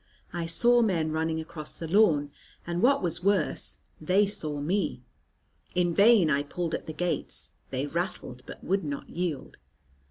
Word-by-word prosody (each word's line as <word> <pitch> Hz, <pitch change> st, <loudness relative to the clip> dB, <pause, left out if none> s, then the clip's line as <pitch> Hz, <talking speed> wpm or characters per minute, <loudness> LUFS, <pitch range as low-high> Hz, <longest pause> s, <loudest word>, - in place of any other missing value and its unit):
I 170 Hz, -1 st, -2 dB
saw 240 Hz, +8 st, +4 dB
men 170 Hz, -8 st, +1 dB
running 160 Hz, 0 st, -1 dB
across 155 Hz, -1 st, -6 dB
the 165 Hz, -, -6 dB
lawn, 160 Hz, -7 st, +3 dB, 0.3 s
and, 175 Hz, +1 st, -2 dB
what 275 Hz, 0 st, +4 dB
was 175 Hz, 0 st, -2 dB
worse, 195 Hz, -5 st, 0 dB, 0.2 s
they 185 Hz, +6 st, +3 dB
saw 155 Hz, -7 st, -4 dB
me. 165 Hz, -4 st, -1 dB, 0.7 s
In 175 Hz, -1 st, +2 dB
vain 205 Hz, -2 st, +6 dB
I 140 Hz, -2 st, +2 dB
pulled 165 Hz, +3 st, -4 dB
at -, -, -3 dB
the -, -, -3 dB
gates; 175 Hz, +1 st, -3 dB, 0.2 s
they 135 Hz, +1 st, -2 dB
rattled, 145 Hz, -5 st, -4 dB
but -, -, -10 dB
would 195 Hz, +3 st, 0 dB
not 145 Hz, -2 st, -5 dB
yield. 170 Hz, -5 st, -3 dB
170 Hz, 160 wpm, -28 LUFS, 155-195 Hz, 0.7 s, vain